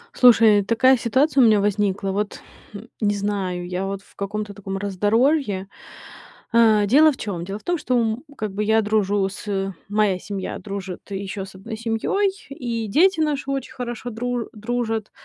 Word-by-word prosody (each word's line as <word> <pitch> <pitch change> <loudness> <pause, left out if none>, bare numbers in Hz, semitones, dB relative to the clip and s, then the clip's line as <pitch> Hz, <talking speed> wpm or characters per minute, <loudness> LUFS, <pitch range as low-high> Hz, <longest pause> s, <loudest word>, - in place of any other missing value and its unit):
Слушай, 225 -4 +6
такая 255 +5 +4
ситуация 265 +4 +2
у - - +7
меня 215 -2 +5
возникла: 200 -1 0
вот 205 +1 -3 0.6
не 205 -1 +2
знаю, 195 -3 -2
я 180 +2 -3
вот 195 0 -4
в - - -24
каком-то 205 +1 -4
таком 195 -1 -5
раздоровье. 205 - +1 0.9
Э, 220 -3 +5
дело 305 +8 +6
в 265 - -8
чём? 185 -8 -4
Дело 195 +2 -5
в - - -25
том, 350 0 0
что, 255 -4 0
м, 225 +2 -1
как 210 -3 -4
бы 210 - -1
я 220 +1 +3
дружу 205 -2 +1
с 195 0 -3 0.2
моя 205 -3 +2
семья 195 -1 -5
дружит 195 -3 -6
еще 195 0 -4
с 190 - -14
одной 220 +4 -7
семьей, 230 - 0 0.2
и 235 -5 -4
дети 330 - +3
наши 290 -3 -1
очень 270 -2 -4
хорошо 240 -1 -5
дру 245 +1 -3
дружат. 225 -1 -3
215 Hz, 170 wpm, -22 LUFS, 195-240 Hz, 0.9 s, у